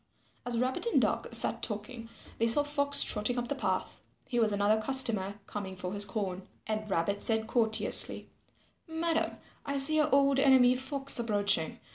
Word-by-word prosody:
As 240 -1 -4
Rabbit 255 - -2
and 465 - 0
Duck - - -3
sat - - +5
talking, 225 +2 -8 0.3
they 230 - 0
saw 260 +6 +2
Fox 285 -1 +4
trotting 215 +3 -1
up 240 0 -5
the - - -2
path. 275 - -5 0.3
He 240 - -4
was 220 -2 0
another 205 +2 -1
customer 220 -6 +3
coming 190 -2 -9
for 180 0 -8
his 205 0 +2
corn. 195 -2 -7 0.2
And 215 0 -6
Rabbit 200 +3 -3
said 220 -1 -1
courteously, 220 -1 +3 0.6
"Madam, 325 0 -4 0.3
I 280 0 -5
see 275 +3 +3
your 305 - 0
old 275 0 +1
enemy 260 -2 +3
Fox 270 0 +1
approaching. 205 -7 -1
230 Hz, 165 wpm, -28 LUFS, 205-275 Hz, 0.6 s, sat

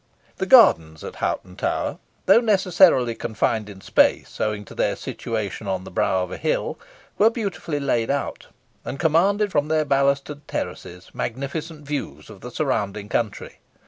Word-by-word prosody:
The - - -2
gardens 80 -1 +6
at - - -8
Hoghton 90 0 -3
Tower, - - -2 0.3
though 195 +5 +7
necessarily 185 - +4
confined 110 -1 -1
in 95 -2 -11
space, - - +1
owing 105 -1 -1
to - - -12
their - - 0
situation 110 -2 -5
on 95 -1 -2
the - - -10
brow 95 +1 +1
of 90 - -7
a - - -5
hill, - - -1 0.4
were 215 - +6
beautifully 200 -9 -3
laid 120 -5 0
out, 140 0 -3 0.4
and 135 +3 -6
commanded 195 +6 +2
from 145 -2 +1
their 155 0 +1
balustred 140 +1 0
terraces 90 +1 -6
magnificent 150 +5 -5
views 140 -5 -5
of 100 - -13
the 125 - -7
surrounding 105 -7 -2
country. 110 0 -3
140 Hz, 155 wpm, -23 LUFS, 105-160 Hz, 0.4 s, though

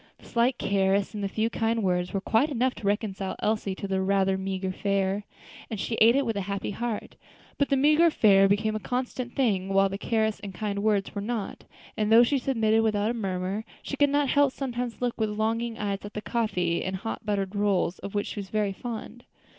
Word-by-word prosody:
The - - -19
slight 240 +2 +1
caress 195 +1 +1
and 210 -1 -4
the - - +1
few 220 +3 -1
kind 225 -1 0
words 180 -1 0
were 195 - -2
quite 230 +9 +2
enough 255 -2 +1
to 210 -2 -5
reconcile 200 -2 -1
Elsie 210 -3 -1
to 200 - -5
the 190 -1 0
rather 195 0 +2
meagre 190 0 -3
fare, 195 +1 -1 0.4
and 220 - -4
she 230 - -2
ate 230 +3 +7
it 280 0 +2
with 225 -2 -1
a 200 - -1
happy 200 +1 -2
heart. 230 +1 -4 0.4
But 280 - +2
the 275 - +3
meagre 305 +5 +5
fare 195 -9 +5
became 215 +2 +1
a - - -1
constant 250 +1 -3
thing, 200 -8 +1
while 195 0 +3
the 195 +1 -5
caresses 220 -1 0
and 195 -2 -8
kind 200 0 -2
words 205 -2 +1
were 200 - -3
not; 220 -1 -4 0.3
and 215 0 0
though 230 +2 +8
she 275 +3 +1
submitted 225 -4 +2
without 215 0 +1
a - - -2
murmur, 195 -1 -2 0.2
she - - -4
could 285 0 +3
not 285 -1 +1
help 285 -2 +3
sometimes 250 -2 -4
looking 245 -1 -1
with 210 -1 -1
longing 225 +1 -1
eyes 200 -2 -2
at 205 - -9
the 210 - -3
coffee 180 -8 0
and 190 +1 -2
hot 225 +4 -5
buttered 200 -2 -2
rolls, 200 -3 +1
of 200 - -7
which 205 - 0
she - - -5
was 195 -1 -7
very 210 -2 0
fond. 240 +2 -7
210 Hz, 220 wpm, -27 LUFS, 195-235 Hz, 0.4 s, though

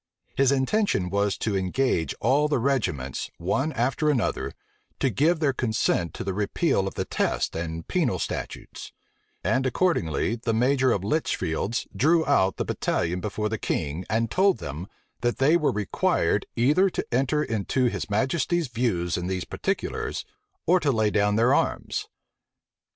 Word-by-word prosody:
His 135 0 +4
intention 135 - +1
was 100 0 +1
to 105 -3 -1
engage 95 - 0
all 140 +6 +3
the 150 - +1
regiments, 95 - -1
one 130 - 0
after 130 +5 +1
another, 130 -7 0 0.5
to 135 - +1
give 155 - +2
their 145 -4 +2
consent 110 -8 0
to - - -4
the 95 - -2
repeal 100 - 0
of - - -6
the - - -2
test - - -1
and 80 0 -4
penal - - +1
statutes; - - -6 0.5
and 120 +8 +1
accordingly, 120 - 0
the 115 -1 -1
major 130 +2 +3
of 100 -4 0
Litchfield's 110 - -1
drew 160 +3 +3
out 95 -10 +2
the - - -1
battalion 90 +1 -1
before 105 +2 -2
the 110 0 -3
king, 75 +5 -2
and 115 +1 0
told 195 0 +3
them, 75 +6 -6 0.3
that 120 0 0
they 145 +5 +4
were 155 -4 +2
required 105 -1 0
either 150 +11 +4
to - - -3
enter 135 +4 +2
into 115 +2 0
his 120 - -2
majesty's 135 +8 0
views 110 -8 0
in 90 0 -3
these 90 -1 -2
particulars, - - -3 0.4
or 180 +2 +4
to 145 -5 +1
lay 110 -3 +1
down 105 0 +2
their 115 +3 +4
arms. - - -1
115 Hz, 155 wpm, -25 LUFS, 95-140 Hz, 0.5 s, His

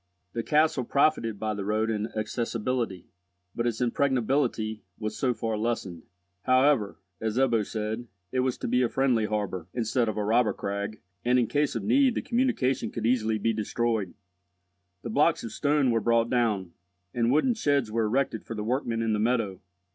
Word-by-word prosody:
The 115 - -1
castle 150 0 +2
profited 125 -5 +1
by 110 -1 -1
the 100 -1 -4
road 110 +2 0
in 105 0 -1
accessibility, 115 -2 -2 0.5
but 120 0 -1
its 115 0 -2
impregnability 125 -3 0 0.2
was 110 -1 -4
so 125 +3 +1
far 110 -1 -2
lessened. 105 -7 -2 0.4
However, 130 - +3 0.2
as 110 +1 -2
Ebbo 120 -5 +3
said, 110 +3 -4 0.2
it 130 - 0
was 125 -1 0
to - - -4
be 125 +2 +2
a 120 - +2
friendly 125 -5 +2
harbour, 100 -5 -3
instead 115 0 +1
of 110 - -4
a 105 - 0
robber 110 0 +3
crag, 100 +2 -4 0.2
and 125 +1 +3
in 125 - +3
case 145 +4 0
of - - -2
need 260 +1 +3
the - - -2
communication 235 - +1
could 115 -2 -4
easily 110 -2 +2
be 115 +2 0
destroyed. 110 -2 -1 0.9
The 115 - -4
blocks 150 +6 +3
of 115 - -5
stone 145 0 +2
were 115 -1 +1
brought 115 +1 +2
down, 110 -8 +1 0.4
and 120 0 +1
wooden 155 - +3
sheds 145 - +1
were 115 0 +1
erected 115 0 0
for 115 - -6
the 105 - -3
workmen 115 -1 -1
in 110 -1 +1
the 105 - 0
meadow. 110 -5 0
115 Hz, 180 wpm, -27 LUFS, 110-130 Hz, 0.9 s, However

